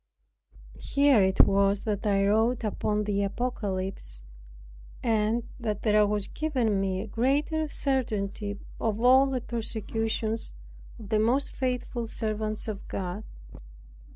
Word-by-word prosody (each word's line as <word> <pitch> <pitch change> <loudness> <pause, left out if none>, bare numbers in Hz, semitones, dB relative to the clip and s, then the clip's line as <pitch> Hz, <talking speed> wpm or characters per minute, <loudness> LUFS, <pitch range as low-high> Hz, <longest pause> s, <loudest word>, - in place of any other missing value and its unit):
Here 280 -5 +4
it 190 0 +5
was 200 0 +3
that 210 -1 -2
I 195 -1 +3
wrote 225 +4 +2
upon 210 0 0
the 200 -1 0
Apocalypse, 195 - -3 0.8
and 225 +1 +1 0.2
that 215 -4 -3
there 210 -1 +4
was 205 -1 -1
given 245 -11 0
me 190 -1 -1
a 220 - -6
greater 290 +7 0
certainty 210 -8 -1 0.2
of 220 -1 -1
all 260 +3 +6
the 260 -2 -2
persecutions 225 -1 -2 0.4
of 210 -3 -11
the 215 -1 +2
most 245 +6 +2
faithful 250 -2 -2
servants 215 -1 -2
of 210 -3 -5
God. 190 +2 -4
215 Hz, 125 wpm, -28 LUFS, 205-240 Hz, 0.8 s, all